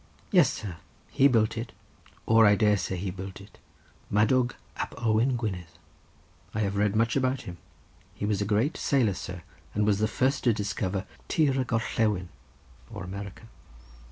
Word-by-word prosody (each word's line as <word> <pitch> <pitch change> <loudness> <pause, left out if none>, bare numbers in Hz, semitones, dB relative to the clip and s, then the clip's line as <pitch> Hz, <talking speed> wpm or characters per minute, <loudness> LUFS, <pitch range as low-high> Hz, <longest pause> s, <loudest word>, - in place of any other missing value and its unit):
Yes, - - +5
sir; 95 -6 -6 0.3
he 140 - +5
built 110 -4 +2
it, 115 +2 -5 0.5
or 115 -1 +6
I 105 - +6
dare 105 0 +4
say 95 +1 -3
he 95 +1 -3
built 95 +1 -7
it, 100 - -15 0.5
Madawg 120 +4 +2 0.2
ap - - -4
Owain 115 +3 +2
Gwynedd. 95 -7 -3 0.9
I 110 - 0
have 100 -1 -1
read 105 0 +1
much 115 +1 +2
about 130 -1 +1
him—he 90 +3 -11
was 105 -1 0
a - - +3
great 110 +9 +1
sailor, 125 -8 +2
sir, 90 -1 -7 0.3
and 105 0 +2
was 105 -1 +2
the 110 - +2
first 130 +4 0
to 120 - +5
discover 100 -2 -2 0.2
Tir 150 -4 +2
y 130 - +1
Gorllewin, 110 -6 0 0.6
or - - -7
America. 100 +3 -7
105 Hz, 160 wpm, -28 LUFS, 100-120 Hz, 0.9 s, or